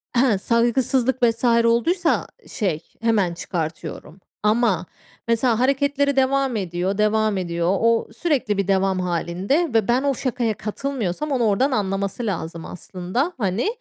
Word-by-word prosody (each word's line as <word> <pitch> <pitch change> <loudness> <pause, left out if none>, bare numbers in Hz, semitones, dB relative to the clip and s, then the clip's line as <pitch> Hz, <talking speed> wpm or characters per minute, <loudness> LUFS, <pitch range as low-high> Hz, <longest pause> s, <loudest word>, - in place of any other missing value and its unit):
Ehe, 240 -4 +4
saygısızlık 245 +4 +1
vs. 230 0 +2 0.2
olduysa, 325 +10 +2 0.2
şey, 190 - -2 0.2
hemen 210 -6 +2
çıkartıyorum 165 0 -5 0.2
ama 210 -5 +2 0.4
mesela, 230 0 +2
hareketleri 280 +2 +1
devam 270 -1 +2
ediyor, 185 0 -2
devam 215 -1 +2
ediyor. 170 +1 0
O 230 0 +2
sürekli 270 - 0
bir 200 -2 0
devam 190 -1 +2
hâlinde 180 - 0
ve 220 -3 +2
ben 245 +3 +2
o 280 -1 +2
şakaya 245 -3 -1
katılmıyorsam, 255 - -3
onu 255 -3 +1
oradan 225 +6 +2
anlaması 200 0 -1
lazım, 165 -5 -4
aslında. 185 - -3
Hani, 205 - 0
225 Hz, 130 wpm, -22 LUFS, 190-260 Hz, 0.4 s, Ehe